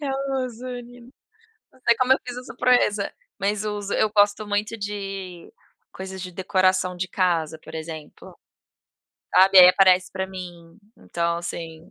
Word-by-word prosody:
eu 275 Hz, -2 st, -2 dB, 0.3 s
uso 250 Hz, +1 st, -8 dB
ali 245 Hz, -1 st, -8 dB
no 240 Hz, +2 st, -16 dB, 0.6 s
Não 260 Hz, -, -24 dB
sei 235 Hz, -, +5 dB
como 255 Hz, 0 st, +3 dB
eu -, -, +4 dB
fiz 245 Hz, -, -6 dB
essa 250 Hz, 0 st, -9 dB
proeza, 210 Hz, -5 st, +2 dB, 0.3 s
mas 205 Hz, +2 st, -1 dB
uso. 205 Hz, -1 st, -4 dB
Eu 215 Hz, -, +2 dB
gosto 205 Hz, 0 st, +2 dB
muito 210 Hz, +2 st, -2 dB
de 195 Hz, -, -6 dB, 0.4 s
coisas 190 Hz, 0 st, -8 dB
de 180 Hz, -, -6 dB
decoração 185 Hz, 0 st, +1 dB
de 185 Hz, +1 st, -3 dB
casa, 165 Hz, -4 st, 0 dB
por 160 Hz, +1 st, -12 dB
exemplo. 160 Hz, -1 st, -9 dB, 1.0 s
Sabe, 190 Hz, 0 st, +7 dB
aí 180 Hz, -, +11 dB
aparece 185 Hz, -1 st, +4 dB
pra 190 Hz, 0 st, -3 dB
mim, 175 Hz, -1 st, -10 dB, 0.2 s
então 170 Hz, 0 st, -2 dB
assim 165 Hz, -1 st, -7 dB
190 Hz, 155 wpm, -23 LUFS, 180-215 Hz, 1.0 s, aí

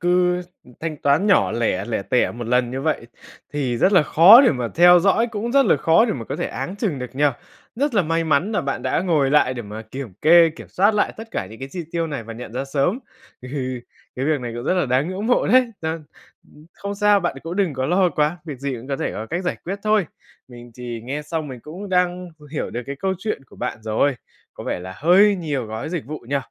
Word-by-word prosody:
cứ 180 Hz, 0 st, +2 dB, 0.4 s
thanh 160 Hz, -2 st, -4 dB
toán 145 Hz, +7 st, +2 dB
nhỏ 200 Hz, -, +3 dB
lẻ, 110 Hz, -5 st, 0 dB
lẻ 110 Hz, -2 st, -2 dB
tẻ 125 Hz, +5 st, +1 dB
một 120 Hz, 0 st, -7 dB
lần 125 Hz, 0 st, +1 dB
như 130 Hz, +2 st, -4 dB
vậy 150 Hz, -6 st, -1 dB, 0.5 s
thì 135 Hz, -5 st, -1 dB
rất 190 Hz, -, +3 dB
là 180 Hz, -, +6 dB
khó 170 Hz, -, +8 dB
để 275 Hz, -, +5 dB
mà 125 Hz, -4 st, -3 dB
theo 175 Hz, +1 st, +7 dB
dõi, 200 Hz, +6 st, +3 dB
cũng 230 Hz, +1 st, -4 dB
rất 275 Hz, 0 st, +5 dB
là -, -, +4 dB
khó 165 Hz, -, +4 dB
để 230 Hz, -, 0 dB
mà 115 Hz, -4 st, -5 dB
có -, -, -5 dB
thể -, -, -2 dB
áng 190 Hz, -, -5 dB
chừng 200 Hz, -, -2 dB
được 125 Hz, -1 st, -7 dB
nhỉ? 145 Hz, +2 st, +1 dB, 0.5 s
Rất 280 Hz, +1 st, 0 dB
là 200 Hz, -, +4 dB
may 165 Hz, 0 st, 0 dB
mắn 160 Hz, +7 st, +1 dB
là -, -, +1 dB
bạn 140 Hz, -1 st, -3 dB
đã -, -, 0 dB
ngồi 155 Hz, -7 st, +1 dB
lại 130 Hz, -3 st, +3 dB
để 120 Hz, -, -5 dB
mà 105 Hz, +2 st, -8 dB
kiểm 115 Hz, -1 st, -8 dB
kê, 165 Hz, +1 st, +7 dB
kiểm -, -, -11 dB
soát 205 Hz, +4 st, +2 dB
lại 210 Hz, -, +1 dB
tất 225 Hz, +1 st, -9 dB
cả 95 Hz, -, -3 dB
những 110 Hz, +4 st, -12 dB
cái 135 Hz, +1 st, -7 dB
chi 175 Hz, +3 st, -6 dB
tiêu 165 Hz, -1 st, -1 dB
này 140 Hz, -6 st, -5 dB
và 115 Hz, +1 st, -8 dB
nhận 115 Hz, 0 st, -9 dB
ra 130 Hz, +3 st, -3 dB
sớm, 140 Hz, -, 0 dB, 0.4 s
thì 130 Hz, -1 st, -4 dB, 0.4 s
cái 130 Hz, -, -2 dB
việc 150 Hz, -2 st, +1 dB
này 120 Hz, -1 st, -5 dB
cũng 120 Hz, -, -6 dB
rất 185 Hz, -, +1 dB
là 180 Hz, -6 st, +1 dB
đáng 130 Hz, +5 st, +1 dB
ngưỡng 195 Hz, +3 st, -4 dB
mộ 245 Hz, -, +2 dB
đấy. 255 Hz, -1 st, +4 dB
Ừm, 160 Hz, -1 st, -3 dB, 0.7 s
không 200 Hz, 0 st, -6 dB
sao, 205 Hz, 0 st, +3 dB
bạn 175 Hz, -6 st, -2 dB
cũng 170 Hz, +3 st, -5 dB
đừng 190 Hz, -6 st, +1 dB
có 130 Hz, 0 st, -2 dB
lo 180 Hz, +2 st, +3 dB
quá, 155 Hz, +1 st, 0 dB
việc 150 Hz, -5 st, -7 dB
gì 140 Hz, 0 st, -3 dB
cũng 120 Hz, +3 st, -9 dB
có 135 Hz, -, -1 dB
thể -, -, -3 dB
có 110 Hz, -, -5 dB
cách 175 Hz, +8 st, -3 dB
giải 180 Hz, -, -1 dB
quyết 195 Hz, +4 st, -4 dB
thôi. 215 Hz, -5 st, +2 dB, 0.4 s
Mình 120 Hz, -1 st, -12 dB
thì 120 Hz, -2 st, -6 dB
nghe 140 Hz, +4 st, -4 dB
xong 155 Hz, 0 st, -4 dB
mình 125 Hz, -3 st, -8 dB
cũng 180 Hz, -, -9 dB
đang 180 Hz, -1 st, 0 dB
h 150 Hz, -, -22 dB
hiểu 155 Hz, -, -3 dB
được 120 Hz, -, -4 dB
cái 140 Hz, -, -5 dB
câu 190 Hz, +6 st, -1 dB
chuyện 205 Hz, -9 st, -3 dB
của -, -, -19 dB
bạn -, -, -4 dB
rồi, 110 Hz, +5 st, +1 dB, 0.4 s
có -, -, -9 dB
vẻ -, -, -3 dB
là 95 Hz, +1 st, -8 dB
hơi 195 Hz, +6 st, +5 dB
nhiều 145 Hz, -8 st, -3 dB
gói 110 Hz, +5 st, -5 dB
dịch 170 Hz, -4 st, -3 dB
vụ 155 Hz, +2 st, -6 dB
nhỉ? 140 Hz, -, +1 dB
155 Hz, 255 wpm, -21 LUFS, 130-180 Hz, 0.7 s, khó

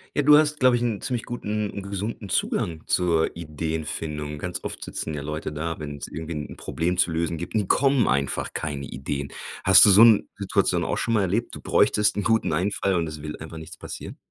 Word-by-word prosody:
Ja, 145 Hz, -, +3 dB
du 150 Hz, +1 st, +8 dB
hast, 150 Hz, 0 st, +2 dB
glaube 130 Hz, -2 st, +5 dB
ich, 120 Hz, -, -1 dB
'n 115 Hz, -4 st, -1 dB
ziemlich 125 Hz, -4 st, -2 dB
guten 105 Hz, -3 st, -3 dB
'n 100 Hz, -, -6 dB
gesunden 100 Hz, +1 st, -5 dB
Zugang 80 Hz, -2 st, -1 dB
zur 85 Hz, -3 st, +1 dB
Ideenfindung. 75 Hz, -2 st, -4 dB
Ganz 90 Hz, +2 st, -5 dB
oft -, -, -6 dB
sitzen 80 Hz, -, -5 dB
ja 75 Hz, -, -4 dB
Leute 75 Hz, +1 st, -4 dB
da, 80 Hz, +2 st, -4 dB
wenn's 75 Hz, -2 st, -6 dB
irgendwie 80 Hz, +1 st, -6 dB
'n 75 Hz, -1 st, -6 dB
Problem 90 Hz, +2 st, -2 dB
zu 90 Hz, -2 st, +2 dB
lösen 85 Hz, 0 st, -1 dB
gibt 85 Hz, +6 st, -6 dB
und 105 Hz, -3 st, +1 dB
kommen 135 Hz, -1 st, +3 dB
einfach 70 Hz, +1 st, -1 dB
keine 70 Hz, -3 st, -4 dB
Ideen. 70 Hz, +2 st, -5 dB, 0.3 s
Hast -, -, +8 dB
du -, -, +7 dB
so 100 Hz, +3 st, +7 dB
'n 115 Hz, -3 st, +6 dB
Situation 100 Hz, -1 st, +1 dB
auch -, -, -1 dB
schon 115 Hz, -, -1 dB
mal 105 Hz, -, +3 dB
erlebt, 100 Hz, +5 st, -1 dB
du -, -, -9 dB
bräuchtest 105 Hz, -1 st, +3 dB
'n 105 Hz, -, -1 dB
guten 110 Hz, -7 st, +1 dB
Einfall 95 Hz, +3 st, 0 dB
und 85 Hz, -2 st, 0 dB
es 75 Hz, -1 st, -7 dB
will 75 Hz, 0 st, -6 dB
einfach 80 Hz, +1 st, -9 dB
nichts 80 Hz, -1 st, -10 dB
passieren? -, -, -8 dB
85 Hz, 215 wpm, -24 LUFS, 75-105 Hz, 0.3 s, du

